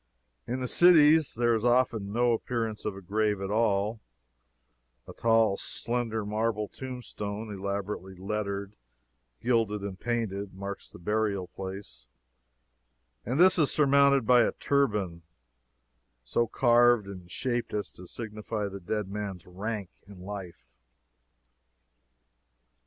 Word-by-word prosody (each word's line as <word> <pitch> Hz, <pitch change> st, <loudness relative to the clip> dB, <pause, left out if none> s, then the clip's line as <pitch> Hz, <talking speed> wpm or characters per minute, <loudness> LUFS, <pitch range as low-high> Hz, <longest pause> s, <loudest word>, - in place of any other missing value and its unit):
In 125 Hz, +2 st, -2 dB
the 125 Hz, -, -1 dB
cities, 160 Hz, -2 st, +6 dB
there 120 Hz, 0 st, +2 dB
is 110 Hz, -1 st, 0 dB
often 120 Hz, -4 st, +2 dB
no 120 Hz, +2 st, +2 dB
appearance 115 Hz, -2 st, -2 dB
of 105 Hz, -, -2 dB
a 95 Hz, -, -10 dB
grave 105 Hz, +2 st, 0 dB
at 95 Hz, 0 st, -4 dB
all; 105 Hz, 0 st, +1 dB, 1.1 s
a -, -, -9 dB
tall, 115 Hz, -3 st, +3 dB
slender 115 Hz, -3 st, -2 dB
marble 105 Hz, 0 st, -1 dB
tombstone, 110 Hz, -5 st, -6 dB
elaborately 100 Hz, -1 st, -4 dB
lettred, 100 Hz, +1 st, -4 dB, 0.7 s
gilded 115 Hz, -4 st, +1 dB
and 95 Hz, -2 st, -5 dB
painted, 100 Hz, -5 st, -2 dB
marks 100 Hz, +1 st, -6 dB
the -, -, -12 dB
burial 100 Hz, 0 st, -1 dB
place, 95 Hz, -11 st, -8 dB, 1.2 s
and 130 Hz, +6 st, 0 dB
this 185 Hz, 0 st, +6 dB
is 150 Hz, -, +3 dB
surmounted 140 Hz, -3 st, +4 dB
by 125 Hz, +1 st, +6 dB
a -, -, +2 dB
turban, 105 Hz, -12 st, 0 dB, 1.0 s
so 115 Hz, -, 0 dB
carved 120 Hz, -1 st, +4 dB
and 90 Hz, -3 st, -10 dB
shaped 120 Hz, +3 st, -2 dB
as 105 Hz, -1 st, -3 dB
to 90 Hz, -, -12 dB
signify 105 Hz, 0 st, -4 dB
the 100 Hz, 0 st, -7 dB
dead 105 Hz, +3 st, -3 dB
man's 100 Hz, -3 st, -5 dB
rank 100 Hz, +1 st, -5 dB, 0.2 s
in 100 Hz, -2 st, -12 dB
life. 95 Hz, -2 st, -8 dB
105 Hz, 125 wpm, -28 LUFS, 100-120 Hz, 1.2 s, cities